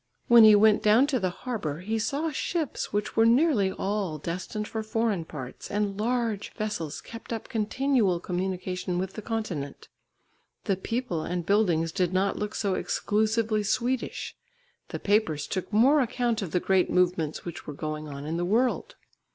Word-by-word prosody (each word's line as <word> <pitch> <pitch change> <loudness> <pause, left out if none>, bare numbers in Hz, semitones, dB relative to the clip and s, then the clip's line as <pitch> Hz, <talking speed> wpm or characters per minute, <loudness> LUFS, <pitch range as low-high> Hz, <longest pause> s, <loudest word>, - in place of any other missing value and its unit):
When 235 -1 +8
he 215 -1 +9
went 215 +1 +5
down 215 +5 +5
to 280 -3 0
the 185 -3 0
harbour 175 - -4
he 220 +4 -2
saw 290 +8 -1
ships 310 +1 -2
which 205 0 -2
were 225 - +5
nearly 230 - +4
all 195 -5 -2
destined 185 +7 -4
for 220 - -3
foreign 220 -5 -1
parts, 130 -5 -8
and 205 -1 -1
large 230 -2 -1
vessels 210 -9 -4
kept 230 +1 -10
up 225 -1 -4
continual 225 -3 +1
communication 180 0 -3
with 190 +1 -3
the 215 - -6
continent. 200 -11 -4 0.7
The 195 - +1
people 210 -3 -3
and 175 +1 -3
buildings 175 -6 +2
did 185 0 0
not 195 +1 +1
look 210 0 -4
so 200 -3 0
exclusively 215 +2 0
Swedish, 240 +5 -2 0.5
the - - -5
papers 200 -8 +1
took 185 - -4
more 255 +8 +5
account 240 -2 0
of 190 - -3
the 180 - +1
great 190 0 +2
movements 175 -4 +1
which 170 - -7
were 150 - -5
going 155 0 -4
on 140 0 -7
in 160 +2 -2
the 175 - -1
world. 245 - 0
205 Hz, 170 wpm, -27 LUFS, 180-230 Hz, 0.7 s, he